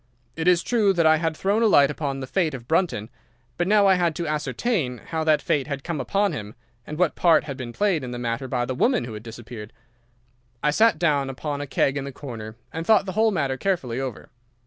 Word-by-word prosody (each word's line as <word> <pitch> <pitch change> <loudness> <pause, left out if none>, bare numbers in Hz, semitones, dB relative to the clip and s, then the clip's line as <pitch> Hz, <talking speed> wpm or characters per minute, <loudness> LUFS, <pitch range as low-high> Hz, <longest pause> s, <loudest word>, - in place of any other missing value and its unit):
It 165 +1 -2
is 180 -1 +4
true 215 -5 +2
that 170 -3 +2
I 160 0 +6
had 160 -1 -2
thrown 200 +3 +1
a 230 - +5
light 145 -8 +5
upon 140 -2 -3
the - - -4
fate 160 0 0
of 120 -2 -10
Brunton, 160 - 0 0.4
but 175 - -1
now 205 0 +5
I 195 - +6
had 175 -3 +1
to 170 - -3
ascertain 150 - -1
how 160 +8 -4
that 155 -2 +3
fate 140 -2 0
had 140 -2 -4
come 165 -5 -3
upon 200 +9 +1
him, 105 -1 -7 0.3
and 155 - -6
what 180 -2 +2
part 165 -3 +4
had 140 -3 -6
been 125 -2 -6
played 185 - 0
in 125 - -5
the 120 - -5
matter 120 +2 -3
by 125 -1 -1
the 130 - -3
woman 235 - +2
who 115 - -7
had 105 - -7
disappeared. 115 -1 -9 0.9
I 150 - +3
sat 215 +2 +4
down 145 -5 +1
upon 145 +2 -4
a 145 - -5
keg 135 +1 +1
in 140 - -2
the 140 - -6
corner 115 -6 -8 0.2
and 165 - -3
thought 210 +2 +4
the 190 - -4
whole 220 +4 +3
matter 140 -9 -1
carefully 135 -11 -1
over. 130 -4 -6
150 Hz, 235 wpm, -24 LUFS, 130-180 Hz, 0.9 s, I